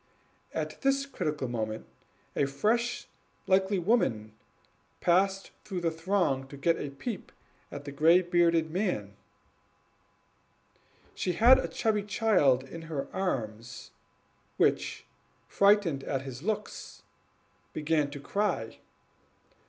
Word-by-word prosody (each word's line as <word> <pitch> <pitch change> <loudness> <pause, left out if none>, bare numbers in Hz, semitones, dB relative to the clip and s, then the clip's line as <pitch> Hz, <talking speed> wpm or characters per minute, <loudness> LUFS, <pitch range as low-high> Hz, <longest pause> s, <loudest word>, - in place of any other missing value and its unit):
At - - -4
this 275 0 +2
critical 150 - -3
moment 110 - -3 0.5
a 140 - +2
fresh, 235 - 0 0.4
comely 190 +1 +3
woman 145 - +1 0.7
pressed 190 +2 +2
through 185 -3 -4
the 165 -1 +1
throng 165 -6 0
to 140 - -10
get 165 +4 +1
a 145 - -4
peep 195 - -6 0.4
at 145 0 -7
the 140 - -5
gray 165 +6 +5
bearded 170 -2 +2
man. 160 - -2 2.0
She 180 - -1
had 240 +7 +7
a - - -2
chubby 215 -3 0
child 200 - +3
in 165 +5 -9
her 145 -4 -3
arms, 120 - -4 0.7
which, - - +1 0.4
frightened 200 -9 +3
at 135 -1 -2
his 130 -2 -7
looks, 205 - -4 0.7
began 150 -1 0
to 145 0 -8
cry. 175 - -2
165 Hz, 115 wpm, -29 LUFS, 135-200 Hz, 2.0 s, had